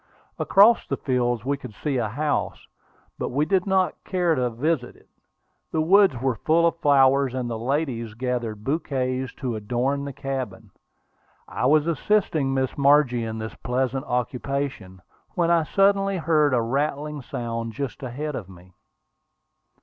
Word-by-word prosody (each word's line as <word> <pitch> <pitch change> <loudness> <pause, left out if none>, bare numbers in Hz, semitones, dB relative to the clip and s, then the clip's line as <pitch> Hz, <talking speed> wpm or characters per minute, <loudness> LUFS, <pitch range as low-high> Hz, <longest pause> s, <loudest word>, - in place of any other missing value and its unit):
Across 215 +4 +5
these - - -2
fields 120 -3 -1
we 140 +1 0
could 110 -6 -10
see 140 +2 -2
a 115 -3 -1
house, 145 +6 -2 0.5
but - - -2
we 145 +4 +1
did 190 +2 +1
not 190 -1 +1
care 180 -3 +1
to 125 -4 0
visit 125 +2 -2
it. - - -23 0.6
The 160 - -1
woods 185 -5 +4
were 130 -2 0
full 165 +2 +3
of 165 0 0
flowers, 135 -2 +4
and 125 -2 -2
the 115 -2 -4
ladies 120 -4 -2
gathered 120 -3 -3
bouquets 130 -3 -2
to 125 -5 -3
adorn 125 +6 -1
the 140 - -5
cabin. 130 -6 -5 0.8
I 125 - -1
was 150 +1 +4
assisting 165 -4 +1
Miss 130 -1 -1
Margie 140 -4 +4
in 110 0 -5
this 110 0 -5
pleasant 130 +2 -2
occupation, 125 -5 -3 0.3
when 170 -1 +2
I 170 -1 +4
suddenly 195 +3 +2
heard 155 -4 +2
a 120 - +1
rattling 145 +4 -2
sound 115 -2 -4
just 135 +2 -5
ahead 140 +4 -4
of 95 -7 -6
me. 90 0 -16
135 Hz, 155 wpm, -24 LUFS, 120-155 Hz, 0.8 s, Across